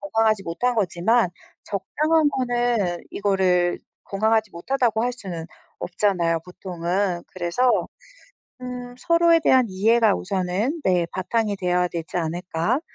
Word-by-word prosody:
건강하지 225 -7 +1
못한 215 +9 -1
거지만 210 +2 +2 0.4
적당한 305 - +1
거는 240 -8 0
이거를 185 -3 +1 0.3
건강하지 220 +1 +1
못하다고 225 +4 0
할 245 - 0
수는 180 -9 -7 0.3
없잖아요 175 -3 0
보통은. 180 0 -2
그래서 175 +6 -2 1.0
음 250 -1 -7
서로에 335 +1 +4
대한 260 -5 +4
이해가 215 +2 +3
우선은 195 - -2
네. 180 -2 +2
바탕이 205 +2 -1
돼야 180 -1 +1
되지 170 -1 -5
않을까 175 - -1
200 Hz, 285 characters per minute, -23 LUFS, 180-245 Hz, 1.0 s, 서로에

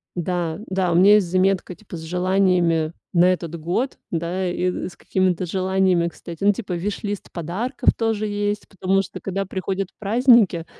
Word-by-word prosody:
Да, 175 -2 -2
да, 185 -2 0
у - - +1
меня 200 +4 +7
есть 200 -4 +3
заметка 185 0 +1
типа 200 -4 -10
с - - -8
желаниями 180 -2 +1 0.2
на 175 0 +5
этот 170 -2 -6
год. 180 - -2
Да, 175 +3 -2
и 180 +1 -2
с - - -16
какими-то 185 -1 0
желаниями, 185 -1 +1
кстати, 170 0 -8
ну 205 - +6
типа 200 -3 -5
вишлист 205 +3 -4
подарков 185 - -1
тоже 220 -2 0
есть, 205 0 -2
потому 195 0 0
что 195 - -8
когда 195 +1 -3
приходят 190 0 -3
праздники, 215 -5 +4
185 Hz, 160 wpm, -22 LUFS, 175-200 Hz, 0.2 s, меня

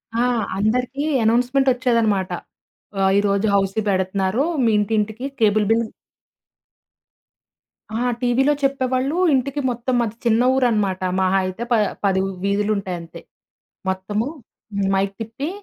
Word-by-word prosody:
ఆ! 240 - +2 0.3
అందరికీ 250 +7 0 0.2
అనౌన్స్‌మెంట్ 250 +4 +2
వచ్చేదనమాట. 230 -6 +1 0.7
ఆహ్, 190 0 +3
ఈరోజు 200 +1 +1
హౌసీ 195 +2 +1
పెడతనారు 190 +5 0 0.2
మీ 225 - +4
ఇంటింటికి 220 +3 -1 0.2
కేబుల్ 210 -1 +3
బిల్ 230 0 +2 2.1
ఆ! - - 0 0.2
టీవీలో 260 +4 +3
చెప్పేవాళ్ళు 270 +2 0 0.2
ఇంటికి 275 +2 0
మొత్తం 245 +1 -2
మాది 225 -2 -1
చిన్న 230 0 +3
ఊరు 260 -1 +2
అనమాట 195 -4 0 0.2
మహా 190 +1 +2
అయితే 185 +5 -4
ప - - +5 0.3
పది 190 -1 +2
వు 195 - -2 0.2
వీధులు 205 +1 +1
ఉంటాయి 185 -2 -4
అంతే. 165 0 -11 0.7
మొత్తము 205 +5 -2 0.7
మైక్ 195 +1 0
తిప్పి, 230 +8 -4
220 Hz, 125 wpm, -21 LUFS, 195-250 Hz, 2.1 s, ప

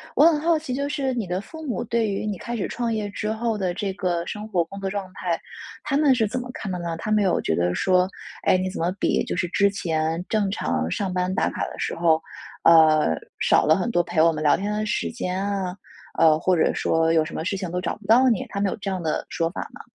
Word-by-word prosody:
我 295 - +6
很 325 -3 +5
好 330 +1 +2
奇， 305 -4 -5
就 280 +2 -1
是 275 -3 -1
你 230 -6 -3
的 180 +2 -2
父 315 +8 -10
母 240 - -2
对 230 -2 0
于 195 +1 -2
你 205 -3 -2
开 240 +5 -5
始 205 - -2
创 240 -2 -2
业 210 -2 -2
之 210 +2 -3
后 225 -1 -1
的 185 -3 -1
这 195 +2 -2
个 175 -3 -1
生 210 +3 -6
活 185 -5 +1
工 195 +4 -10
作 195 -1 -2
状 200 -1 -3
态， 175 -3 -2 0.5
他 280 -2 0
们 285 -3 +4
是 225 - +2
怎 250 +5 -2
么 245 0 -7
看 195 - -5
的 180 - -3
呢？ 170 -1 -3
他 215 +6 -4
们 215 -1 +4
有 185 -3 +2
觉 80 - 0
得 90 +2 +1
说： 185 -1 +3 0.4
“哎， - - +5
你 185 0 -1
怎 185 - -6
么 170 +2 +1
比 - - +2
就 - - -3
是 175 0 -1
之 200 +1 +3
前 165 -3 -1
正 210 -3 +1
常 80 - -1
上 190 - -2
班 180 +1 0
打 - - +1
卡 - - -3
的 - - -9
时 - - -2
候， 160 -1 +2 0.4
呃， 160 - +6 0.3
少 - - +4
了 155 - +5
很 215 +7 -1
多 175 - +3
陪 160 -2 0
我 165 0 +5
们 155 - -4
聊 150 -1 +4
天 205 +2 -3
的 215 0 -1
时 210 - -1
间 190 -4 -3
啊？” 195 -3 -2 0.4
呃， 155 -1 +5
或 185 +1 +2
者 160 - +2
说： 165 0 +1
“有 160 -1 +3
什 - - -8
么 160 - -3
事 195 +2 -2
情 185 -2 -4
都 180 +1 -2
找 170 - -3
不 210 -1 -15
到 255 +4 +6
你。” 225 -6 0
他 200 - -4
们 195 -2 +1
有 - - -4
这 200 -2 -4
样 185 -2 -3
的 155 - -1
说 165 -1 -1
法 185 - -7
吗？ - - -10
190 Hz, 290 characters per minute, -24 LUFS, 170-215 Hz, 0.5 s, 我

